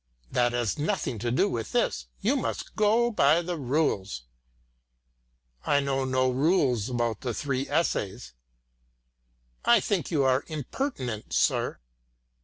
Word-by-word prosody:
"That 120 Hz, -1 st, +2 dB
has 120 Hz, +3 st, -1 dB
nothing 140 Hz, -6 st, -1 dB
to 120 Hz, +3 st, -2 dB
do 130 Hz, +12 st, +2 dB
with 115 Hz, -, -4 dB
this. -, -, 0 dB
You -, -, +2 dB
must -, -, -3 dB
go 225 Hz, +3 st, +3 dB
by 165 Hz, -4 st, +4 dB
the 175 Hz, +1 st, -3 dB
rules." 125 Hz, -, -1 dB, 1.4 s
"I 145 Hz, -, +3 dB
know 135 Hz, -1 st, 0 dB
no 130 Hz, 0 st, +2 dB
rules 130 Hz, -, +2 dB
about 120 Hz, -3 st, -1 dB
the 120 Hz, -4 st, -3 dB
three 135 Hz, -2 st, -2 dB
essays." 105 Hz, -, -1 dB, 1.3 s
"I -, -, +6 dB
think -, -, -1 dB
you 145 Hz, -4 st, +1 dB
are 130 Hz, +1 st, +2 dB
impertinent, 145 Hz, -, -4 dB
sir." -, -, +1 dB
130 Hz, 130 wpm, -27 LUFS, 120-155 Hz, 1.4 s, I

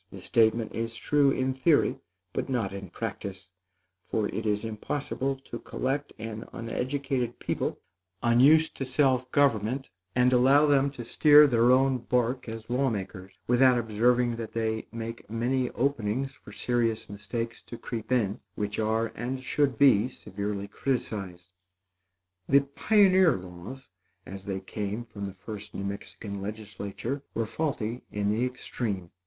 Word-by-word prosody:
This -, -, -10 dB
statement 115 Hz, 0 st, +2 dB
is 115 Hz, 0 st, -3 dB
true 145 Hz, +4 st, +3 dB
in 130 Hz, -1 st, 0 dB
theory, 145 Hz, +4 st, +3 dB, 0.3 s
but -, -, -2 dB
not 115 Hz, -7 st, -1 dB
in 100 Hz, -2 st, -7 dB
practice; 95 Hz, +1 st, -6 dB, 0.5 s
for 105 Hz, -2 st, -1 dB
it 110 Hz, 0 st, -3 dB
is 105 Hz, +1 st, 0 dB
impossible 135 Hz, +4 st, -2 dB
to 120 Hz, -, -6 dB
collect 140 Hz, +2 st, -2 dB
an 110 Hz, 0 st, -6 dB
uneducated 125 Hz, +1 st, -2 dB
people, -, -, -2 dB, 0.4 s
unused 135 Hz, +7 st, +5 dB
to -, -, -2 dB
self 130 Hz, -1 st, +2 dB
government, 130 Hz, -2 st, +1 dB, 0.2 s
and 125 Hz, 0 st, +4 dB
allow 135 Hz, +4 st, +6 dB
them 140 Hz, -1 st, +4 dB
to 120 Hz, -4 st, -7 dB
steer 150 Hz, +4 st, +7 dB
their 120 Hz, -3 st, +4 dB
own 130 Hz, 0 st, +4 dB
bark 125 Hz, +1 st, 0 dB
as 115 Hz, 0 st, -7 dB
law 130 Hz, +2 st, +1 dB
makers, 95 Hz, -3 st, -5 dB
without 125 Hz, +1 st, +5 dB
observing 120 Hz, +1 st, +2 dB
that 115 Hz, -1 st, -6 dB
they 110 Hz, -1 st, -1 dB
make 115 Hz, 0 st, -6 dB
many 125 Hz, +3 st, 0 dB
openings 135 Hz, 0 st, -1 dB
for 120 Hz, -, -14 dB
serious 115 Hz, 0 st, 0 dB
mistakes 105 Hz, +3 st, -5 dB
to 120 Hz, -, -9 dB
creep 115 Hz, 0 st, -6 dB
in, 110 Hz, -6 st, +1 dB, 0.2 s
which 105 Hz, +1 st, -3 dB
are 110 Hz, +1 st, +1 dB
and 130 Hz, +3 st, -4 dB
should 140 Hz, -2 st, +1 dB
be 125 Hz, -4 st, +5 dB
severely 100 Hz, -3 st, -5 dB
criticised. 100 Hz, -7 st, -3 dB, 1.0 s
The 140 Hz, +1 st, +6 dB
pioneer 185 Hz, +4 st, +4 dB
laws, 90 Hz, +9 st, -9 dB, 0.4 s
as 95 Hz, 0 st, -9 dB
they 95 Hz, -1 st, -3 dB
came 105 Hz, +4 st, -4 dB
from 100 Hz, -3 st, -7 dB
the 95 Hz, -1 st, -7 dB
first 105 Hz, +2 st, -8 dB
New 100 Hz, -, -3 dB
Mexican 100 Hz, 0 st, -6 dB
legislature, 105 Hz, +5 st, -5 dB
were 115 Hz, -, 0 dB
faulty 120 Hz, -3 st, -2 dB
in 105 Hz, 0 st, 0 dB
the 110 Hz, +3 st, +1 dB
extreme. 110 Hz, -7 st, -4 dB
115 Hz, 145 wpm, -28 LUFS, 105-130 Hz, 1.0 s, steer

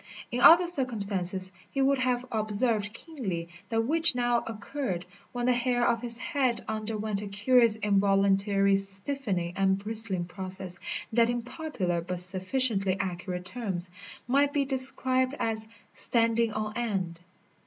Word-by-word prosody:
In 245 Hz, -, -1 dB
other 345 Hz, +2 st, +8 dB
circumstances 200 Hz, -, -1 dB, 0.2 s
he 275 Hz, -, -4 dB
would 270 Hz, 0 st, +3 dB
have 250 Hz, -1 st, 0 dB
observed 215 Hz, -1 st, 0 dB
keenly 210 Hz, -, -6 dB, 0.2 s
that 225 Hz, -1 st, +1 dB
which 325 Hz, +2 st, +5 dB
now 240 Hz, -1 st, +2 dB
occurred, 215 Hz, -4 st, -4 dB, 0.3 s
when 245 Hz, -1 st, -3 dB
the 250 Hz, -, +4 dB
hair 245 Hz, 0 st, +1 dB
of 230 Hz, -1 st, +1 dB
his 235 Hz, -1 st, +2 dB
head 265 Hz, -4 st, -1 dB
underwent 215 Hz, -1 st, -3 dB
a 210 Hz, -, -6 dB
curious 225 Hz, +3 st, +4 dB
involuntary 200 Hz, -1 st, +2 dB
stiffening 195 Hz, -2 st, -1 dB
and 190 Hz, 0 st, +2 dB
bristling 210 Hz, -3 st, +1 dB
process 185 Hz, -1 st, -4 dB, 0.3 s
that 235 Hz, 0 st, +4 dB
in 240 Hz, -1 st, -2 dB
popular 220 Hz, -, -3 dB
but 180 Hz, +1 st, -4 dB
sufficiently 195 Hz, +2 st, +1 dB
accurate 180 Hz, -1 st, -4 dB
terms, 185 Hz, -5 st, -3 dB, 0.4 s
might 280 Hz, +3 st, +2 dB
be 285 Hz, -1 st, +1 dB
described 260 Hz, 0 st, 0 dB
as 220 Hz, -1 st, -1 dB, 0.3 s
"standing 230 Hz, -1 st, +3 dB
on 215 Hz, 0 st, -4 dB
end." 195 Hz, -8 st, -2 dB
220 Hz, 135 wpm, -28 LUFS, 195-250 Hz, 0.4 s, other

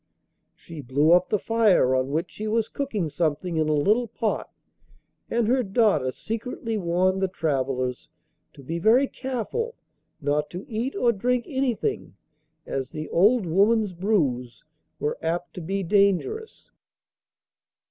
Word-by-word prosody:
She 165 Hz, -3 st, -10 dB
blew 140 Hz, +5 st, +2 dB
up 180 Hz, +1 st, +5 dB
the 210 Hz, -, +2 dB
fire 210 Hz, -, +3 dB
on 130 Hz, 0 st, +1 dB
which 160 Hz, +5 st, -2 dB
she 215 Hz, -, -5 dB
was 220 Hz, 0 st, 0 dB
cooking 225 Hz, -, -2 dB
something 160 Hz, +2 st, -1 dB
in 155 Hz, -1 st, +1 dB
a -, -, +3 dB
little 210 Hz, +11 st, +2 dB
pot, 220 Hz, -1 st, -2 dB, 0.8 s
and 230 Hz, -2 st, +1 dB
her 255 Hz, +2 st, +3 dB
daughter 195 Hz, -, +2 dB
secretly 225 Hz, -, -4 dB
warned 185 Hz, 0 st, +1 dB
the 190 Hz, -, +2 dB
travellers 135 Hz, -7 st, -2 dB, 0.4 s
to 140 Hz, -, -14 dB
be 165 Hz, +6 st, -3 dB
very 230 Hz, +9 st, +5 dB
careful 265 Hz, -, -4 dB, 0.4 s
not 150 Hz, 0 st, 0 dB
to 180 Hz, +3 st, -7 dB
eat 235 Hz, +4 st, -3 dB
or 240 Hz, -, +3 dB
drink 240 Hz, +3 st, 0 dB
anything, 270 Hz, -, -2 dB, 0.5 s
as 135 Hz, -1 st, -3 dB
the 155 Hz, 0 st, -6 dB
old 210 Hz, +4 st, +4 dB
woman's 200 Hz, +4 st, +2 dB
brews 150 Hz, -, -1 dB, 0.4 s
were 150 Hz, -, -2 dB
apt 170 Hz, +2 st, -2 dB
to 180 Hz, -, -7 dB
be 195 Hz, +4 st, -2 dB
dangerous. 200 Hz, -, 0 dB
190 Hz, 140 wpm, -25 LUFS, 155-230 Hz, 0.8 s, up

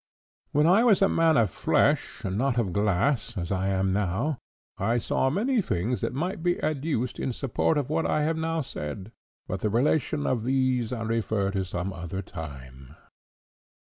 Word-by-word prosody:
When 150 Hz, +2 st, +3 dB
I 190 Hz, +7 st, +5 dB
was 210 Hz, -5 st, +5 dB
a -, -, +6 dB
man 165 Hz, -3 st, +3 dB
of 110 Hz, -6 st, +3 dB
flesh, -, -, +1 dB
and 95 Hz, -1 st, -2 dB
not 130 Hz, +3 st, +1 dB
of 100 Hz, -7 st, 0 dB
glass, 105 Hz, +4 st, +1 dB
as 85 Hz, 0 st, -3 dB
I 95 Hz, 0 st, 0 dB
now 100 Hz, -, 0 dB, 0.4 s
am, -, -, -3 dB
I 115 Hz, +4 st, +2 dB
saw 130 Hz, +3 st, +1 dB
many 225 Hz, -, +1 dB
things 110 Hz, -, -1 dB
that -, -, -1 dB
might 175 Hz, +9 st, -3 dB
be 175 Hz, +1 st, +1 dB
adduced 140 Hz, -5 st, -1 dB
in 130 Hz, -, -1 dB
support 135 Hz, +5 st, 0 dB
of 145 Hz, 0 st, -2 dB
what 160 Hz, +1 st, +1 dB
I 150 Hz, -, +1 dB
have 160 Hz, +2 st, +1 dB
now 165 Hz, 0 st, -1 dB
said, 95 Hz, -, -6 dB, 0.4 s
but 95 Hz, -, -3 dB
the 105 Hz, -, 0 dB
relation 145 Hz, +5 st, +1 dB
of 120 Hz, -4 st, 0 dB
these 130 Hz, -2 st, +1 dB
I 115 Hz, -2 st, -3 dB
refer 110 Hz, -3 st, 0 dB
to 95 Hz, -1 st, -1 dB
some 95 Hz, +1 st, -4 dB
other 85 Hz, +3 st, -5 dB
time." 70 Hz, -6 st, -9 dB
120 Hz, 180 wpm, -27 LUFS, 95-150 Hz, 0.4 s, a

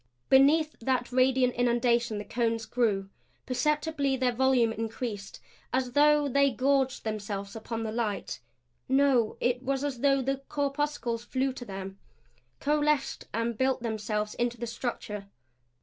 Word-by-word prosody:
Beneath 300 Hz, +4 st, +5 dB
that 250 Hz, 0 st, -1 dB
radiant 255 Hz, 0 st, +3 dB
inundation 235 Hz, -2 st, +1 dB
the 205 Hz, -, -5 dB
cones 230 Hz, -1 st, -1 dB
grew. 215 Hz, -4 st, 0 dB, 0.3 s
Perceptibly 295 Hz, +1 st, 0 dB
their 255 Hz, -1 st, +2 dB
volume 245 Hz, -2 st, +3 dB
increased 225 Hz, -2 st, -5 dB, 0.3 s
as 255 Hz, -1 st, 0 dB
though 295 Hz, +2 st, +4 dB
they 280 Hz, +1 st, +3 dB
gorged 265 Hz, +1 st, +1 dB
themselves 205 Hz, -2 st, -4 dB
upon 225 Hz, +1 st, -4 dB
the 220 Hz, -, -3 dB
light. 220 Hz, -3 st, -2 dB, 0.5 s
No 265 Hz, -4 st, +3 dB
it 245 Hz, +1 st, 0 dB
was 270 Hz, +1 st, -1 dB
as 280 Hz, -4 st, -3 dB
though 275 Hz, 0 st, +3 dB
the 270 Hz, +1 st, 0 dB
corpuscles 280 Hz, -5 st, -1 dB
flew 265 Hz, +1 st, -1 dB
to 245 Hz, -, -8 dB
them, 195 Hz, -1 st, -7 dB, 0.6 s
coalesced 300 Hz, -1 st, 0 dB
and 230 Hz, +1 st, -1 dB
built 260 Hz, +1 st, 0 dB
themselves 210 Hz, -2 st, -2 dB
into 240 Hz, 0 st, -1 dB
the 235 Hz, -, -4 dB
structure. 215 Hz, -4 st, -5 dB
245 Hz, 135 wpm, -28 LUFS, 225-275 Hz, 0.6 s, Beneath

